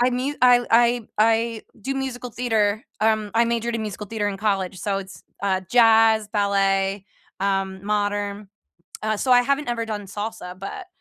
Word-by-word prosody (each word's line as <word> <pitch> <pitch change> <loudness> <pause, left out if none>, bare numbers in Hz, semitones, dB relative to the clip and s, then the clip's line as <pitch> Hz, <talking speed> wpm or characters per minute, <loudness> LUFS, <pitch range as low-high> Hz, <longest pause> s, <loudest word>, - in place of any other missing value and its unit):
I 245 +1 +3
mu 255 +3 -1
I 245 -1 +6
I 235 0 +3
I 225 +1 +2 0.2
do 270 +6 -3
musical 255 -2 -4
theater, 220 -3 0 0.2
um, 215 -1 +1
I 230 - +4
majored 235 0 -1
in 230 - -2
musical 210 -1 -6
theater 210 -1 -2
in 195 - -4
college. 195 -3 -1
So 195 +2 -1
it's, 190 -2 -10 0.2
uh, 190 -2 +1
jazz, 225 -2 +5
ballet, 195 -1 +1 0.3
um, 195 0 -1
modern. 205 -1 -2 0.7
So, 255 +4 +1
I 245 0 +6
haven't 280 +1 0
ever 235 -1 -1
done 210 -2 -5
salsa, 200 -3 -6
but 355 - -7
215 Hz, 165 wpm, -23 LUFS, 200-235 Hz, 0.7 s, I